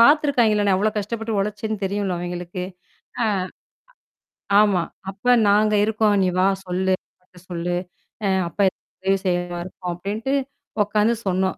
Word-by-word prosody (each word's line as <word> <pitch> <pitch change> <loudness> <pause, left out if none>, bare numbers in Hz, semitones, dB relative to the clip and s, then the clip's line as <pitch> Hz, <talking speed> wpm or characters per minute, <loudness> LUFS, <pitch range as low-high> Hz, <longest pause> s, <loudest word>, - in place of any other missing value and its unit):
பாத்துருக்காங்களா? 240 -6 +5
நான் 190 - +4
எவ்வளவு 215 +1 0
கஷ்டப்பட்டு 220 +1 -2
உழைச்சேன்னு 210 +1 -2
தெரியும்ல 195 -1 -1
அவங்களுக்கு. 175 +1 -4 0.6
அ - - +2 1.4
ஆமா. 200 -4 +3 0.3
அப்போ 205 +6 +1 0.2
நாங்க 210 +1 +4
இருக்கோம். 215 -1 +2
நீ - - +3
வா. 185 - +5 0.2
சொல்லு. 185 +1 +1 0.6
சொல்லு. 175 0 -2 0.7
அப்பா 200 - 0 0.4
உதவி 195 +1 +2
செய்வார் 175 0 -1 0.2
அப்படின்ட்டு 210 +9 -3 0.5
உக்காந்து 210 +3 +2
சொன்னோம். 190 0 +1
200 Hz, 115 wpm, -23 LUFS, 185-215 Hz, 1.4 s, பாத்துருக்காங்களா